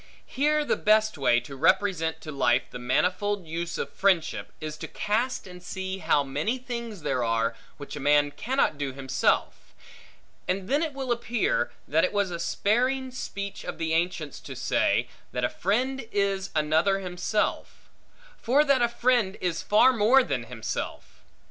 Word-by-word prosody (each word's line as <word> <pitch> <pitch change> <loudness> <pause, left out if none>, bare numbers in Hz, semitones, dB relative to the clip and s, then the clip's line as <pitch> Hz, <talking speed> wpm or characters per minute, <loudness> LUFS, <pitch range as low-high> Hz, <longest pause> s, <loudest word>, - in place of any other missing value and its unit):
Here 300 +2 +1
the - - +2
best 215 0 +3
way 125 -4 +3
to 140 +3 -10
represent 165 +1 +1
to 155 - -7
life 125 -3 +2
the - - -7
manifold 180 +10 0
use 165 +2 -4
of - - -4
friendship, 185 -5 +1
is 155 -1 -5
to - - -6
cast 235 +5 -1
and 180 -1 -11
see 190 +1 -5
how 145 -6 +2
many 145 - -1
things 235 - -6
there 125 - 0
are, 115 0 0 0.2
which 145 0 -8
a - - -5
man 145 +1 +3
cannot 245 - 0
do 140 -2 -2
himself; 130 -1 -1 0.7
and 185 +1 -1
then 285 +4 +2
it 320 -3 -2
will 265 -2 -3
appear, 240 - 0 0.2
that - - +2
it - - +1
was 205 -3 +1
a 170 - -4
sparing 255 +9 0
speech 200 -5 -6
of - - -5
the 160 -1 -1
ancients, 165 -3 -1
to - - -9
say, - - +1 0.3
that 125 - -2
a 125 - +2
friend 250 +6 -1
is 200 -1 0
another 160 +5 +2
himself; 195 +3 -2 0.5
for 270 +6 +4
that 275 -4 +3
a 240 - +3
friend 235 -4 +1
is 175 -3 -1
far 215 +5 +5
more 240 +4 +5
than 135 - -2
himself. 115 -3 -6
190 Hz, 165 wpm, -27 LUFS, 150-235 Hz, 0.7 s, far